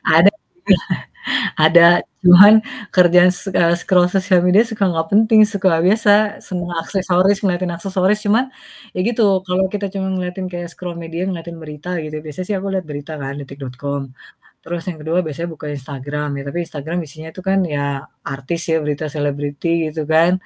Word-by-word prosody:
Ada, 175 +5 +7 1.3
ada 170 +1 +7 0.4
cuman 190 +4 +9 0.4
kerjaan 180 0 +6
s 180 +2 -5
eee, 170 0 +4
scroll 180 -2 +3
sosial 185 -1 +2
media 195 +4 +5
suka 215 -4 -2
gak 160 0 -2
penting, 220 +1 +5
suka 190 -6 +1
biasa 210 +2 +3 0.4
semua 175 -1 -4
aksesoris 190 +1 +1
ngeliatin 180 -2 0
aksesoris 190 +3 0
cuman 220 +5 +3 0.5
ya - - -6
gitu, 235 -1 0 0.2
kalau 185 +1 +1
kita 205 -1 -2
cuman 190 -1 -2
ngeliatin 180 +1 -4
kayak 175 0 -5
scroll 175 -2 -7
media 165 +1 -5
ngeliatin 170 -2 -6
berita 150 +2 -8
gitu, 155 0 -7
biasa 150 +3 -8
sih 210 - -2
aku 195 - -6
liat 185 -2 -2
berita 145 +2 -7
kan, 135 0 -4
detik.com. 140 0 -6 0.6
Terus 170 0 -5
yang 165 -3 -5
kedua 160 +3 -1
biasanya 165 +3 -4
buka 150 0 -10
Instagram, 145 +2 -5
ya - - -5
tapi 170 - -4
Instagram 160 +4 -5
isinya 155 +3 -10
itu 185 - -9
kan 195 - +2 0.2
ya 145 - -1 0.5
artis 135 +5 -4
ya, 160 - +3
berita 150 +1 -3
selebriti 145 +3 -2
gitu 155 +1 -5
kan, 165 +2 +5
175 Hz, 165 wpm, -18 LUFS, 155-190 Hz, 1.3 s, cuman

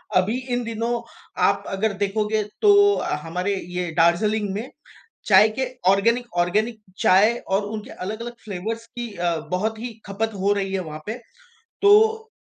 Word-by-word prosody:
अभी 195 +7 +2 0.2
इन 245 0 0
दिनों 230 +1 -2 0.4
आप - - +3
अगर 200 +2 -1
देखोगे 210 +1 0 0.2
तो, 405 -1 +6
हमारे 180 +6 -2
ये 180 -2 -4
दार्जिलिंग 205 +6 +2
में 230 +6 -5 0.6
चाय 215 - +7
के 265 - 0 0.2
ऑर्गेनिक 230 +5 +3
ऑर्गेनिक 215 +6 +1 0.2
चाय 210 +5 +4
और 195 +2 0
उनके 215 +3 -6
अलग-अलग 220 +5 -6
फ़्लेवर्स 220 +3 -5
की 240 0 -7
अ, 175 -2 0
बहुत 215 +5 -1
ही 235 +1 -5
ख़पत 215 +3 -2
हो 200 +2 +3
रही 195 -1 -2
है 195 - 0
वहाँ 155 -1 -7
पे। 225 +3 -4 0.6
तो, 440 +2 +5
215 Hz, 150 wpm, -23 LUFS, 190-235 Hz, 0.6 s, चाय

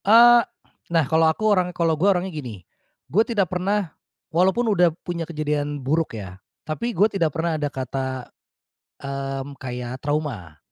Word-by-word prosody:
Eee, 235 +3 +8 0.5
nah 165 -3 +3
kalau 160 +3 +3
aku 185 +7 -2
orang 180 -2 +2
kalau 170 -2 +1
gue 170 +6 +2
orangnya 185 -1 0
gini, 120 - -7 0.4
gue 200 +11 +3
tidak 200 -7 0
pernah 190 0 -1 0.4
walaupun 190 +8 +3
udah 175 -2 +5 0.2
punya 170 -2 -4
kejadian 150 -2 -2
buruk 155 -4 0
ya, 95 -2 -9 0.2
tapi 195 +10 -3
gue 210 -3 +3
tidak 195 -7 +1
pernah 165 0 0
ada 145 - 0
kata, 130 -1 -4 0.7
mmm, 135 0 -5
kayak 125 0 -5
trauma, 140 - -3
160 Hz, 150 wpm, -23 LUFS, 135-185 Hz, 0.7 s, Eee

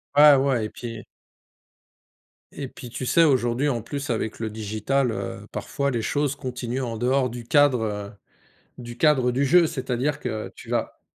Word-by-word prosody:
Ouais, 145 0 +9
ouais 130 -4 +1
et - - -5
puis 115 -1 -8 1.5
et 140 -2 -5
puis, 125 -1 -10
tu 130 - -5
sais, 165 +6 +4
aujourd'hui, 130 -1 +2
en 120 -5 -1
plus, 140 +3 -5
avec 110 -1 -2
le 110 -1 -2
digital, 110 +5 -1
heu, - - -5
parfois 140 0 -2
les 120 -3 -1
choses 145 +4 0
continuent 125 -1 -4
en 115 -2 -4
dehors 125 +2 +1
du 120 0 -8
cadre, 145 -3 +4
heu, 105 -1 -4 0.7
du 120 -1 -8
cadre 130 -3 +3
du 135 +3 +1
jeu. 170 +5 +5
C'est-à-dire 135 -2 -2
que 110 0 -4
tu - - -13
vas - - -2
125 Hz, 170 wpm, -24 LUFS, 115-140 Hz, 1.5 s, Ouais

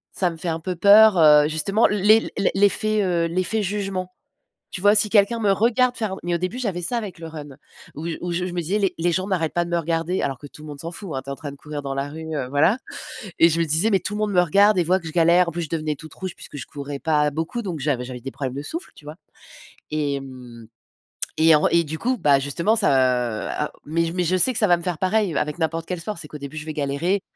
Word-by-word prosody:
ça 180 - +1
me 165 - -8
fait 170 - -6
un 160 0 -2
peu 180 +2 -4
peur, 205 +2 +7
heu, 150 -2 +6
justement 160 +8 +2
les 210 +2 +3 0.2
l'effet, 210 +2 +2
heu 175 -3 +1
l'effet 185 +5 -1
jugement. 195 -2 -3 0.6
Tu - - -5
vois 205 +3 +4
si 210 0 +4
quelqu'un 220 +2 +3
me 205 -2 +3
regarde 245 +5 +2
faire. 210 -4 -2
Mais 175 0 -2
au - - +2
début 185 +7 -3
j'avais 200 -8 -3
ça 175 +8 -1
avec 205 -7 -5
le 165 - -7
run 150 -4 -9 0.4
où 155 - -7
j 165 - -4
où 175 - -3
je 175 +1 -1
je 180 - -5
me 175 - -2
disais 180 +6 -1
les 195 -2 +1
les 175 +1 +1
gens 185 +3 -1
n'arrêtent 175 -5 -1
pas 175 0 0
de - - -8
me 170 - 0
regarder, 165 +2 -1
alors 135 -2 -2
que 145 - -10
tout 150 - -14
le 155 - -10
monde 145 -1 -9
s'en 165 +3 -6
fout, 195 +2 -8
hein. 130 - -3
Tu 135 - -11
es - - -3
en - - -7
train 145 0 -7
de 140 - -12
courir 150 +1 -7
dans 135 -1 -4
la 135 +1 -2
rue 160 +1 -7
heu, 140 -4 -2
voilà, 145 - +2 0.6
et 165 - +7
je 165 +1 0
me 165 - +2
disais: 160 +8 +2
«Mais 195 - +3
tout 190 - -4
le 210 - -3
monde 215 -1 0
me 180 -2 +4
regarde 200 +4 +4
et 180 - +3
voit 185 +3 +2
que 165 - -8
je - - -5
galère», 170 +1 +4
en - - -6
plus, 170 +1 -4
je 155 - -7
devenais 155 -2 -2
toute 155 +2 -12
rouge 185 -1 -6
puisque - - -12
je - - -6
courais 140 -1 -7
pas 150 -1 +2
beaucoup. 160 - -3
Donc 180 -8 -5
j'avais 130 -3 -1
j'avais 125 -1 -8
des 135 - -6
problèmes 130 -2 -5
de 140 - -4
souffle, 335 - -6
tu - - -17
vois? 150 +1 -9 0.8
Et 145 -2 -1
mmh 125 -3 -11 0.7
et 160 0 +6
en 150 - +3
et 170 - +3
du 160 +1 -5
coup, 250 +5 -1
bah, 145 -6 +4
justement, 170 +10 0
ça 130 - +1 0.2
mais 165 +3 0
je 165 - -3
mais 180 -1 0
je 180 +2 +1
sais 255 +8 +4
que - - -1
ça 215 - +3
va 175 - +5
me - - -10
faire 175 -2 -3
pareil 190 -2 0
avec 150 +3 -2
n'importe 165 0 -2
quel 180 -2 -4
sport. 210 +3 -5
C'est 150 - -7
qu'au 150 - -9
début, 140 +1 -8
je 150 - -8
vais 155 - -5
galérer. 155 +7 -1
170 Hz, 280 wpm, -22 LUFS, 150-195 Hz, 0.8 s, peur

